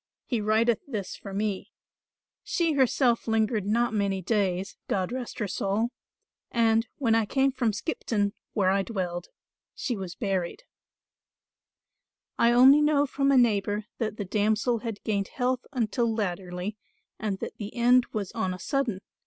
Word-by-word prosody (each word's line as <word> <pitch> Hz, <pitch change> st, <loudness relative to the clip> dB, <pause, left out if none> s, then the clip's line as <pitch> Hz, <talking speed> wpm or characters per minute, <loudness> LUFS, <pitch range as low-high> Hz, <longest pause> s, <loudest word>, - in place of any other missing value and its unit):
He 235 Hz, -4 st, -1 dB
writeth 220 Hz, +2 st, +2 dB
this 210 Hz, -8 st, -4 dB
for 200 Hz, -, -9 dB
me. 200 Hz, 0 st, -2 dB, 0.7 s
She 335 Hz, -3 st, +1 dB
herself 255 Hz, -3 st, +2 dB
lingered 220 Hz, -2 st, +1 dB
not 235 Hz, +2 st, +2 dB
many 200 Hz, -2 st, 0 dB
days, 190 Hz, -1 st, -1 dB
God 185 Hz, 0 st, -1 dB
rest 250 Hz, -1 st, -5 dB
her 210 Hz, -, -1 dB
soul, 200 Hz, +4 st, 0 dB, 0.6 s
and, 230 Hz, 0 st, +2 dB
when 235 Hz, -5 st, +2 dB
I 225 Hz, -2 st, +2 dB
came 270 Hz, +3 st, +2 dB
from 245 Hz, -4 st, 0 dB
Skipton, 210 Hz, -3 st, -1 dB, 0.2 s
where 190 Hz, -3 st, +3 dB
I 195 Hz, +1 st, +2 dB
dwelled, 180 Hz, -4 st, -3 dB, 0.5 s
she 250 Hz, -, -2 dB
was 185 Hz, -4 st, -6 dB
buried. 195 Hz, -, -2 dB, 1.8 s
"I 235 Hz, -, +5 dB
only 265 Hz, +5 st, +7 dB
know 295 Hz, -1 st, +3 dB
from 275 Hz, 0 st, +1 dB
a 275 Hz, -, +5 dB
neighbour 210 Hz, -3 st, +2 dB
that 220 Hz, -2 st, -2 dB
the 205 Hz, -, -3 dB
damsel 215 Hz, +4 st, +1 dB
had 225 Hz, -3 st, -6 dB
gained 200 Hz, -2 st, 0 dB
health 255 Hz, 0 st, -1 dB
until 235 Hz, -2 st, 0 dB
latterly 190 Hz, -1 st, -3 dB, 0.4 s
and 210 Hz, -3 st, -2 dB
that -, -, -6 dB
the 210 Hz, 0 st, -6 dB
end 245 Hz, +1 st, +4 dB
was 205 Hz, -4 st, -3 dB
on 190 Hz, -5 st, -2 dB
a -, -, -11 dB
sudden. 255 Hz, -8 st, -1 dB
220 Hz, 155 wpm, -27 LUFS, 200-240 Hz, 1.8 s, only